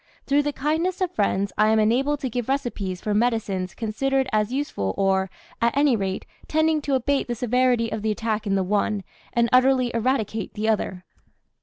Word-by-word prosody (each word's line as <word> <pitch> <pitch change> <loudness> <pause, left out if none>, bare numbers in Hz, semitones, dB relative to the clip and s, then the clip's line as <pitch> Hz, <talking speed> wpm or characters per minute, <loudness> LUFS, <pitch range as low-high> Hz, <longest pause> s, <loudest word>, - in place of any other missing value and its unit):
Through 285 +1 +3
the 290 0 -1
kindness 320 +6 -1
of 370 -2 0
friends 200 - 0
I 215 - +5
am 220 - +4
enabled 260 +7 +2
to 260 - -2
give 245 +1 -3
recipes 220 -9 -2
for 210 - -2
medicines 210 -5 0
considered 265 +4 0
as 215 +1 +1
useful, 255 - -2
or, 190 -1 +2 0.3
at 235 +3 +2
any 285 -3 +4
rate, 195 -2 -3 0.2
tending 315 0 +2
to 285 -2 0
abate 275 +2 0
the 240 - -2
severity 245 -1 +1
of 220 - -3
the 220 - -1
attack 215 0 -2
in 195 - +1
the 190 - +1
one, 205 +1 0 0.3
and 235 0 +3
utterly 255 -1 +4
eradicate 225 -3 -1
the 215 +1 -2
other. 190 -4 -1
230 Hz, 185 wpm, -24 LUFS, 210-270 Hz, 0.3 s, I